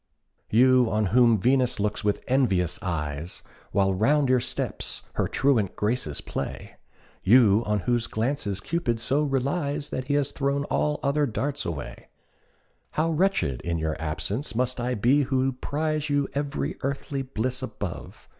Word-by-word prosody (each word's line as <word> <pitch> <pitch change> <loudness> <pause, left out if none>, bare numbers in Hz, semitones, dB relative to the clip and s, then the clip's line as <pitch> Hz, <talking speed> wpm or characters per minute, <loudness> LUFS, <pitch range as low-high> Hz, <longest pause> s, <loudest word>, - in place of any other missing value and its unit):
You 125 +2 +5
on 105 0 +1
whom 120 -3 +5
Venus 125 +2 +2
looks 105 0 -1
with 105 0 0
envious 100 -10 +1
eyes, 80 -3 -3 0.3
While 95 -1 +2
round 135 +8 +2
your 130 -1 +4
steps 125 - -2
her - - 0
truant 125 -9 +1
Graces 105 -9 -1
play, - - -6 0.4
You 110 -1 +5
on 105 -2 +1
whose 120 +2 0
glances 110 -4 -2
Cupid 120 -6 -1
so 130 +6 +2
relies 145 +1 -1
That 130 0 -3
he 145 - +1
has 145 -1 +1
thrown 140 0 0
all 150 +1 0
other 145 +1 +2
darts 140 +5 -2
away; 80 -4 -6 0.9
How 165 +2 +2
wretched 150 - +1
in 85 -1 -2
your 80 -1 -1
absence 100 - -3
must 125 +1 0
I 125 +1 -1
be 125 +8 +3
Who 130 0 +1
prize 150 +3 -2
you 145 -1 +1
ev'ry 145 +1 -2
earthly 140 0 -3
bliss 130 0 -3
above! 105 -8 -6
125 Hz, 150 wpm, -26 LUFS, 105-140 Hz, 0.9 s, You